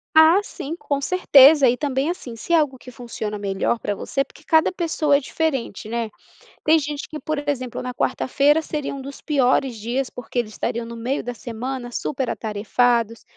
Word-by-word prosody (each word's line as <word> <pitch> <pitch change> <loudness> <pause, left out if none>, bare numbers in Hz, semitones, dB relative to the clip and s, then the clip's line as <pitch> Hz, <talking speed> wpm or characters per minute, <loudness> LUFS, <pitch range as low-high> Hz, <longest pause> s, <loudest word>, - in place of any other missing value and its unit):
Ah, 315 +4 +7
sim, 320 -5 -6
com 285 -5 -2
certeza. 285 -4 +6
E - - +1
também, 280 +2 -1
assim, 245 -10 -6
se 230 - -5
é 335 - +6
algo 290 -4 0
que 250 - -12
funciona 225 -4 -6
melhor 200 +3 -1
pra 205 - -2
você 275 +6 -1
porque 275 +2 -16
cada 320 0 +4
pessoa 325 -5 +1
é 280 - 0
diferente, 265 -8 -2
né? 230 -1 -2 0.5
Tem 320 +1 +5
gente 290 -1 -4
que, 305 - -6
por 295 -2 -3
exemplo, 255 -4 -3
na 250 0 -4
quarta-feira, 290 +5 +2
seria 300 -3 -4
um 275 - -7
dos 275 +1 -9
piores 265 -3 +1
dias 240 +5 -2
porque 245 0 -7
eles 215 -3 -1
estariam 230 +2 -3
no 235 0 -8
meio 250 +5 -2
da 245 +1 -5
semana 240 +3 -5
super 265 -1 -2
atarefados. 230 +2 0
265 Hz, 190 wpm, -22 LUFS, 235-295 Hz, 0.5 s, Ah